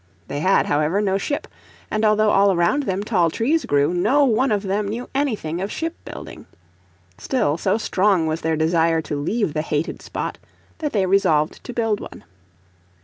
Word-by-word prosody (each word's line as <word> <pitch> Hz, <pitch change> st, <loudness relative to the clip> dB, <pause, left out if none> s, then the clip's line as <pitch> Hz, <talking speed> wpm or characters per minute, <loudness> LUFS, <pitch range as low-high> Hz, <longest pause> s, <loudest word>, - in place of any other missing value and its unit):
They 145 Hz, -, -3 dB
had, 185 Hz, +5 st, +3 dB
however, 155 Hz, +6 st, +1 dB
no 195 Hz, -2 st, +1 dB
ship, 290 Hz, +7 st, -3 dB, 0.4 s
and 215 Hz, 0 st, 0 dB
although 215 Hz, 0 st, +4 dB
all 200 Hz, 0 st, +4 dB
around 190 Hz, +11 st, +1 dB
them 190 Hz, +1 st, -1 dB
tall 180 Hz, -6 st, +2 dB
trees 280 Hz, -, 0 dB
grew 145 Hz, +3 st, +2 dB
no 270 Hz, +11 st, +3 dB
one 255 Hz, +1 st, +2 dB
of 205 Hz, -1 st, 0 dB
them 200 Hz, +1 st, -1 dB
knew 230 Hz, +5 st, -4 dB
anything 215 Hz, -, -1 dB
of 195 Hz, +2 st, -3 dB
ship 330 Hz, +1 st, -3 dB
building. -, -, -9 dB, 0.7 s
Still, 155 Hz, -, 0 dB
so 170 Hz, -, 0 dB
strong 195 Hz, -5 st, +2 dB
was 160 Hz, +1 st, -2 dB
their 160 Hz, 0 st, 0 dB
desire 160 Hz, 0 st, +2 dB
to 150 Hz, -, -4 dB
leave 205 Hz, +1 st, -1 dB
the 155 Hz, -, 0 dB
hated 155 Hz, +1 st, -3 dB
spot -, -, -5 dB, 0.4 s
that 300 Hz, -3 st, -2 dB
they 200 Hz, -3 st, +1 dB
resolved 180 Hz, -5 st, +2 dB
to -, -, -5 dB
build 225 Hz, -3 st, 0 dB
one. -, -, -10 dB
195 Hz, 180 wpm, -21 LUFS, 160-220 Hz, 0.7 s, although